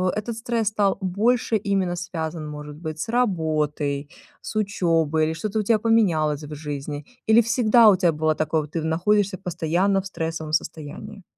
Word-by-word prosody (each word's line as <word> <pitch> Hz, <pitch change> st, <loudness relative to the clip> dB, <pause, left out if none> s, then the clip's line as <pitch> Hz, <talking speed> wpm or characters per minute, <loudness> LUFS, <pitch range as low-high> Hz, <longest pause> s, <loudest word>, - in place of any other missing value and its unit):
этот 215 Hz, +2 st, -3 dB
стресс 230 Hz, -2 st, -1 dB
стал 205 Hz, -2 st, +1 dB
больше 220 Hz, +5 st, +1 dB
именно 195 Hz, -3 st, 0 dB
связан, 165 Hz, -3 st, -4 dB
может 150 Hz, 0 st, -8 dB
быть, 155 Hz, -1 st, -6 dB
с -, -, -3 dB
работой, 155 Hz, -, 0 dB, 0.3 s
с 215 Hz, -, -6 dB
учёбой 165 Hz, -6 st, +1 dB
или 160 Hz, -, -1 dB
что-то 210 Hz, +6 st, -2 dB
у -, -, 0 dB
тя 220 Hz, +1 st, +3 dB
поменялось 165 Hz, -10 st, +2 dB
в 150 Hz, +1 st, -8 dB
жизни? 145 Hz, 0 st, -5 dB, 0.2 s
Или 220 Hz, +1 st, +6 dB
всегда 230 Hz, -1 st, +5 dB
у 195 Hz, -, +6 dB
тебя 175 Hz, -3 st, +3 dB
было 155 Hz, 0 st, +1 dB
такое, 155 Hz, +1 st, 0 dB
вот 150 Hz, 0 st, -10 dB
ты 165 Hz, -, -2 dB
в -, -, -4 dB
находишься 195 Hz, +4 st, +1 dB
постоянно 180 Hz, +4 st, 0 dB
в 195 Hz, -, -7 dB
стрессовом 160 Hz, -3 st, -4 dB
состоянии? 180 Hz, +7 st, -4 dB
175 Hz, 175 wpm, -23 LUFS, 155-210 Hz, 0.3 s, Или